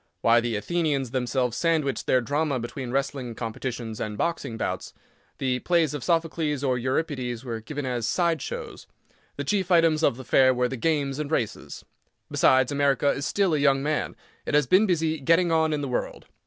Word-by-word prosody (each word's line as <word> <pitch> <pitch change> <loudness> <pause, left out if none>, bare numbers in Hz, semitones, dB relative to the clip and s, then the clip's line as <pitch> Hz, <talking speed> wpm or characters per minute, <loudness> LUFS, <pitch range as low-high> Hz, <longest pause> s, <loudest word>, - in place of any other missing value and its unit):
Why 115 +1 +5
the 120 -1 -2
Athenians 145 0 -1
themselves 125 -1 -1
sandwiched 160 -5 0
their 130 - +3
drama 145 +1 -1
between 120 +2 -6
wrestling 135 -2 -2
competitions 115 -1 -5
and 105 -1 -4
boxing 165 -8 -2
bouts. - - -4 0.4
The 125 -1 -1
plays 170 -3 +1
of 145 -4 -5
Sophocles, 160 -2 0
or 130 -3 +1
Euripides, 130 -2 -2
were 115 -2 -4
given 145 +4 -5
as 120 -3 -2
"side 170 0 +1
shows." - - -7 0.5
The 145 - -4
chief 190 +4 0
items 165 -3 +4
of 120 - +2
the 130 - -9
fair 130 +1 +4
were 125 0 +1
the 130 - -5
games 140 0 -1
and 150 -2 -3
races. 125 -9 -3 0.5
Besides, 130 +1 +4
America 140 -1 +2
is 135 - -3
still 195 -4 +1
a 150 - +2
young 135 -1 +3
man. 150 +1 -1 0.3
It - - -1
has 150 -1 +4
been 185 - +4
busy 160 -3 0
"getting 165 +5 +3
on 160 -1 +2
in 150 -1 -1
the 140 - -3
world." 125 - -3
140 Hz, 185 wpm, -25 LUFS, 125-160 Hz, 0.5 s, Why